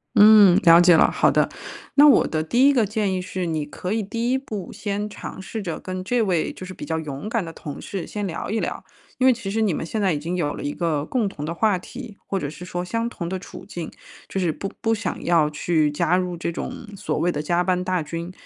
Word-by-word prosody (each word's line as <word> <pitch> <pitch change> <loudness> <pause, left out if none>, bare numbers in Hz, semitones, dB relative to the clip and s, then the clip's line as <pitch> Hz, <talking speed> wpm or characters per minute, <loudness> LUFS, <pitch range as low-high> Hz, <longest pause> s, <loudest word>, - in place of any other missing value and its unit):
嗯， 205 -3 +8
了 170 -1 +8
解 175 -1 +7
了， - - +5
好 - - +3
的。 - - +3 0.5
那 290 +1 +7
我 285 - +6
的 155 - -1
第 245 - +4
1 285 - +5
个 240 -5 +3
建 205 -1 -1
议 185 - -1
是， 185 0 -4
你 160 -2 -1
可 180 +6 -4
以 225 - 0
第 230 +4 -2
1 260 - +3
步 215 -9 -6
先 205 0 -3
尝 205 -2 -8
试 220 +3 -5
着 170 -5 -4
跟 185 0 -5
这 235 +5 +1
位 180 -6 0
就 185 - -9
是 185 - -8
比 - - -9
较 160 - -2
勇 150 +5 -6
敢 230 -5 -1
的 165 - -8
同 145 -3 -8
事 190 -5 -5
先 210 -1 -4
聊 170 -4 -4
一 220 - 0
聊。 - - -3 0.4
因 260 - +4
为 260 - +7
其 225 -4 -5
实 220 +2 0
你 210 -5 +2
们 160 - -3
现 215 +6 -3
在 190 -4 +2
已 - - -1
经 165 +5 -3
有 150 -4 -1
了 - - -7
一 145 - -2
个 155 -4 -1
共 225 +1 0
同 150 -6 -6
的 165 - -3
话 205 +2 +2
题， 235 +2 -9
或 195 - -2
者 145 - -3
是 175 +4 -9
说 175 -1 -4
相 230 +5 -2
同 170 -8 -5
的 190 - -2
处 185 - -10
境， 170 -2 -6 0.4
就 195 - -3
是 175 -3 +1
不 195 +5 -5
不 225 -1 +2
想 225 - -4
要 165 -3 +3
去 155 0 +1
加 170 +4 +2
入 180 -1 -2
这 170 - -2
种 200 +6 -6
所 - - -3
谓 175 - +2
的 150 - -3
加 175 +3 +1
班 180 0 0
大 185 -1 0
军， 165 +3 -5
185 Hz, 275 characters per minute, -23 LUFS, 170-215 Hz, 0.5 s, 嗯